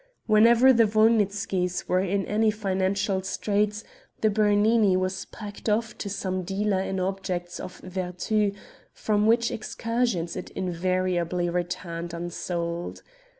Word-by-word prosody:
Whenever 235 +4 +6
the 230 -2 +5
Wolnitzkys 205 -4 +1
were 180 - +2
in 195 +1 0
any 215 +1 +2
financial 195 -1 0
straits 210 +2 -1 0.4
the 215 - +3
Bernini 210 -1 +3
was 185 0 -2
packed 205 0 -7
off 225 +2 0
to 200 - -4
some 185 -2 -2
dealer 195 +2 0
in 190 0 -2
objects 185 -2 -3
of 180 - -7
vertu, 185 +3 -1 0.4
from 210 0 +1
which 235 +1 +3
excursions 225 -6 -2
it 180 - -6
invariably 180 -1 -1
returned 170 -1 -4
unsold. 170 0 -4
195 Hz, 120 wpm, -26 LUFS, 180-215 Hz, 0.4 s, Whenever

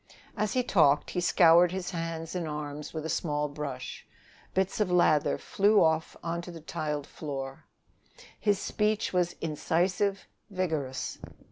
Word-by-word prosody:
As 210 -1 -1
he 255 - +2
talked 150 - +3
he 180 - -1
scoured 175 0 +6
his 185 0 -4
hands 165 -1 -4
and 175 -3 -2
arms 150 -1 -5
with 160 -1 -5
a - - -1
small 150 -3 0
brush; 145 -3 -6 0.5
bits 190 +2 0
of 210 -3 +2
lather 160 -4 +3
flew 205 0 +3
off 160 0 +1
on 170 0 -2
to 175 - -10
the 170 -1 -8
tiled 150 -2 -3
floor. 135 -3 -6 0.7
His 205 -2 +2
speech 210 +1 0
was 180 -1 +1
incisive, 185 +5 0 0.2
vigorous. 160 -9 -2
165 Hz, 145 wpm, -29 LUFS, 150-185 Hz, 0.7 s, scoured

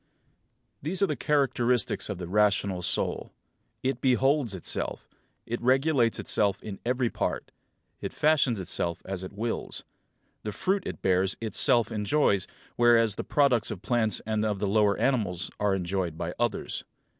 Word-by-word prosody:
These 180 +7 0
are - - +7
the - - -2
characteristics 125 -7 +1
of 100 - -3
the 90 -1 -6
rational 100 -1 +1
soul: - - 0 0.5
It 130 -1 -1
beholds 130 -3 +2
itself; 90 - -3 0.4
it 120 +1 -4
regulates 130 -1 +2
itself 100 -2 +1
in 100 -3 -7
every 125 0 0
part; - - -3 0.5
it - - -5
fashions 140 -7 +2
itself 85 -2 -3
as 95 -1 -5
it 95 - -7
wills; 115 +3 -4 0.6
the 105 - -5
fruit 190 - -1
it - - -7
bears 95 0 +2
itself 115 +1 +3
enjoys, 105 -2 +1 0.3
whereas 115 -2 +4
the - - -5
products 130 -6 +2
of 95 - -6
plants 115 -3 0
and 110 0 -1
of 105 -2 0
the 100 +1 -1
lower 105 0 +3
animals 100 -9 0
are 105 -1 +2
enjoyed 90 -3 -2
by 85 +2 -4
others. 120 -3 -2
110 Hz, 150 wpm, -27 LUFS, 95-125 Hz, 0.6 s, are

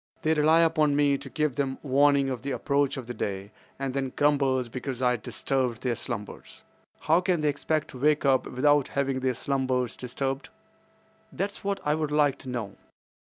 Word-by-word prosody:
They 155 - +3
rely 160 +2 +4
upon 155 -3 +3
me 145 -1 +3
to 140 - -9
give 150 -2 -1
them 135 -2 -1
warning 140 0 +3
of 125 -3 -4
the 140 - -4
approach 140 0 0
of 120 -2 -6
day, 100 0 -4 0.3
and 135 -1 -3
then 135 -1 -2
grumble 140 -3 +2
because 125 +1 -6
I 125 -1 +2
disturb 125 +2 -1
their 120 +2 -2
slumbers. 105 -3 -6 0.4
How 165 +3 +3
can 180 -3 +1
they 150 - +2
expect 150 +1 -1
to 130 - -10
wake 150 +2 +2
up 135 -1 +3
without 145 +2 +2
having 135 -1 -1
their 130 -1 0
slumbers 130 -2 -1
disturbed? 135 +2 -4 0.8
That's 200 +3 -4
what 200 0 -1
I 150 - +2
would 155 -1 -1
like 145 -2 +2
to 130 - -8
know. 115 -6 -5
140 Hz, 180 wpm, -27 LUFS, 130-150 Hz, 0.8 s, rely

